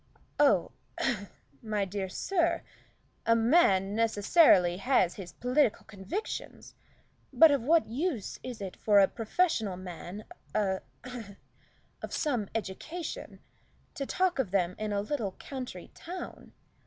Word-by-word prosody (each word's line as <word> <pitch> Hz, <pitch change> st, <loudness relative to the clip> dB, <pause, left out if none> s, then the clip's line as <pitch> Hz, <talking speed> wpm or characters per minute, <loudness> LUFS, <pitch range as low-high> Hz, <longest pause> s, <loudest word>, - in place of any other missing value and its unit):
"Oh 210 Hz, -13 st, +4 dB, 0.3 s
a 210 Hz, -6 st, -1 dB, 0.3 s
my 210 Hz, -2 st, -1 dB
dear 190 Hz, 0 st, -4 dB
sir 340 Hz, -, 0 dB, 0.6 s
a 230 Hz, -, +6 dB
man 225 Hz, -, +4 dB
necessarily 205 Hz, -, +4 dB
has 195 Hz, -5 st, +2 dB
his 180 Hz, -5 st, -9 dB
political 250 Hz, -, +1 dB
convictions, 220 Hz, -, -6 dB, 0.6 s
but 325 Hz, -2 st, +7 dB
of 280 Hz, -3 st, +2 dB
what 315 Hz, +6 st, +4 dB
use 255 Hz, -, -3 dB
is 245 Hz, -4 st, -7 dB
it 190 Hz, -2 st, -5 dB
for 210 Hz, -2 st, +3 dB
a 195 Hz, -, +6 dB
professional 225 Hz, -, 0 dB
man 185 Hz, +3 st, -8 dB, 0.3 s
a 190 Hz, -3 st, +1 dB, 1.2 s
of -, -, -6 dB
some 245 Hz, -, -1 dB
education, 305 Hz, -, -5 dB, 0.5 s
to 275 Hz, -, -4 dB
talk 365 Hz, -4 st, +1 dB
of 250 Hz, -8 st, +1 dB
them 180 Hz, -2 st, +1 dB
in 215 Hz, 0 st, -2 dB
a 200 Hz, -1 st, 0 dB
little 210 Hz, -4 st, -2 dB
country 255 Hz, -10 st, -7 dB
town? 360 Hz, +2 st, -8 dB
220 Hz, 125 wpm, -30 LUFS, 195-290 Hz, 1.2 s, but